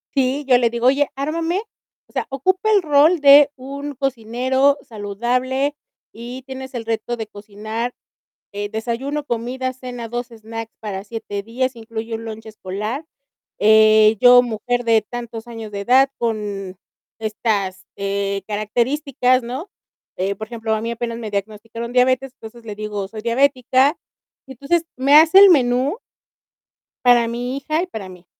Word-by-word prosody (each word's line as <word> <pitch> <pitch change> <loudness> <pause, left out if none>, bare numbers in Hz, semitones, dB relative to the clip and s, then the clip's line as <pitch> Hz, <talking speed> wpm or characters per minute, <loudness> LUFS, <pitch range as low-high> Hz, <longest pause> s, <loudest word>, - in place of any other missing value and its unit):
Sí, 270 +2 +1
yo 250 -2 +6
le 240 -1 +2
digo, 235 +1 0
oye, 275 +2 +3
ármame, 325 +6 -1 0.5
o - - -25
sea, - - -1
ocupa 370 +10 0
el 410 -2 +5
rol 310 +2 +4
de 285 0 +8
un 280 +2 -7
cocinero 260 +1 +1
saludable 250 +7 -2 0.4
y 240 +3 -8
tienes 265 0 -8
el 235 -2 -5
reto 230 +1 -2
de 220 -2 -5
cocinar, 215 +3 -5 0.6
eh, 205 0 -4
desayuno, 245 +7 -3
comida, 255 +1 -3
cena, 250 -2 -7
2 240 +1 -4
snacks 225 0 -8
para 200 -3 -5
7 205 -2 -6
días, 255 +4 -2
incluye 225 0 -6
un 225 0 -7
lunch 220 0 -8
escolar. 215 - -5 0.5
Eh, 215 0 +6
yo, 245 0 +8
mujer 245 +1 -2
de 225 -1 +4
tantos 235 -1 -7
años 225 -2 -8
de 200 -1 -4
edad, 260 +6 +4
con 205 -5 -3 0.4
estas, 210 -4 -2
eh, 200 0 -2
características, 250 +4 0
¿no?, 260 +10 -6 0.5
eh, 195 +2 -1
por 220 - -6
ejemplo, 225 -1 -3
a 215 - -3
mí 230 +1 -3
apenas 235 0 -4
me 220 -3 -6
diagnosticaron 220 +3 -5
diabetes, 255 +1 +2
entonces 230 -1 -13
le 210 -2 -6
digo: 210 -2 -4
"Soy 215 +2 -8
diabética". 260 +4 +2 0.5
Entonces, 280 +6 -1
me 275 +3 +4
hace 320 +5 +8
el 400 0 +10
menú 265 - +3 1.1
para 240 -1 +5
mi 245 +3 -3
hija 310 +4 -1
y - - -5
para 210 - -7
mí. 180 -1 -14
240 Hz, 150 wpm, -20 LUFS, 220-265 Hz, 1.1 s, el